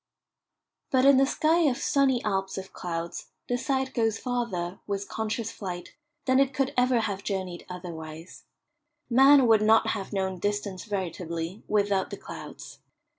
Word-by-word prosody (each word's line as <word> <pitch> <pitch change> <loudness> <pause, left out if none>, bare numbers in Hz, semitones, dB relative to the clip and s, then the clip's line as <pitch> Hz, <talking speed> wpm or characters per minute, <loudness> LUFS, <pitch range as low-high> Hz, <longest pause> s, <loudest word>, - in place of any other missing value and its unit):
But 260 0 +3
in 275 -1 +7
the 270 0 +4
sky 315 +4 +2
of 245 - -2
"sunny 270 -3 +2
Alps" 195 -2 -1
of 190 0 -7
clouds 170 -1 -5 0.2
the 245 - 0
sight 265 +1 -1
goes 225 -3 +1
farther, 230 -8 -3
with 200 -1 -3
conscious 220 0 -3
flight, 180 -3 -7 0.3
than 260 0 +4
it 275 -1 +2
could 270 -1 0
ever 250 -1 +3
have 200 -3 -3
journeyed 185 -3 -4
otherwise. 165 -2 -8 0.7
Man 270 +2 +7
would 220 -2 +5
not 220 +1 +4
have 200 -4 -3
known 190 -2 -2
distance 205 -1 -2
veritably 175 -2 -4
without 200 -2 +1
the - - -6
clouds. - - -10
205 Hz, 150 wpm, -27 LUFS, 185-250 Hz, 0.7 s, in